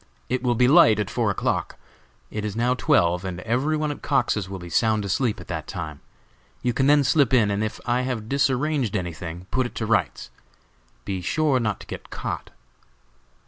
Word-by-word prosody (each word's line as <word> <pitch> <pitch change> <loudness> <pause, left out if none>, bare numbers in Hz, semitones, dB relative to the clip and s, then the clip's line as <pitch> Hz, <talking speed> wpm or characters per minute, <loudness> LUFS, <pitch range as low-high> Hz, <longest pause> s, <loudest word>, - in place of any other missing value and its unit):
It 130 0 0
will 125 -1 +1
be 125 +1 +4
light 135 - +6
at 105 - -2
four - - +1
o'clock; - - -1 0.5
it 105 - -4
is 105 -1 -3
now 120 +2 +2
twelve, 90 -7 +2
and 90 -2 -4
every 130 +9 0
one 150 -1 -1
at 145 - -8
Cox's 120 -8 0
will 95 - -5
be 85 -1 -9
sound 110 +4 +1
asleep 105 +4 0
at - - -11
that 80 -3 -4
time. 80 -6 -6 0.6
You 125 - +1
can 135 +3 +2
then 145 0 +5
slip 140 -2 +3
in, 105 -4 +3
and 100 +1 0
if 110 - -4
I 125 +1 +1
have 125 -4 -3
disarranged 135 -2 +1
anything, 85 -1 -5
put 130 +2 +1
it - - -15
to 110 - -2
rights. 115 0 0 0.7
Be 95 -2 -3
sure 140 - +1
not 105 -4 -1
to - - -10
get - - -8
caught!" - - -5
115 Hz, 195 wpm, -24 LUFS, 95-130 Hz, 0.7 s, light